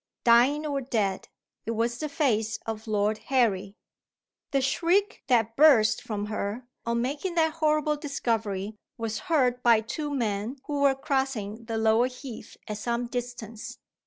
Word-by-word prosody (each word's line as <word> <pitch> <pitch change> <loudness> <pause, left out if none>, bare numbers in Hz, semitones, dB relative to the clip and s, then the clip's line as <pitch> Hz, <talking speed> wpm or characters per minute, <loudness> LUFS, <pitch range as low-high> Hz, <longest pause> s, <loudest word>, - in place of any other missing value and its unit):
Dying 250 +6 +5
or 285 -2 -1
dead, 215 -7 -1 0.4
it 230 - -1
was 235 +1 0
the 305 - -3
face 225 -7 0
of 225 0 -5
Lord 210 0 +1
Harry. 205 -7 +1 0.7
The 275 - +1
shriek 350 +10 +1
that 230 -3 +2
burst 255 -7 +5
from 210 -4 -4
her, 210 +3 -4 0.2
on 235 0 +1
making 295 +7 -3
that 320 -2 +2
horrible 305 -1 +1
discovery, 220 -8 -2 0.2
was 225 -1 -3
heard 250 -6 +2
by 230 -3 +5
two 295 +7 -4
men 225 -2 -1
who 290 -1 -2
were 275 -1 +4
crossing 260 -6 -2
the 225 -1 -3
lower 220 +2 +3
heath 255 -2 -9
at 210 -1 -4
some 235 +2 -1
distance. 240 -2 -6
240 Hz, 150 wpm, -27 LUFS, 220-280 Hz, 0.7 s, Dying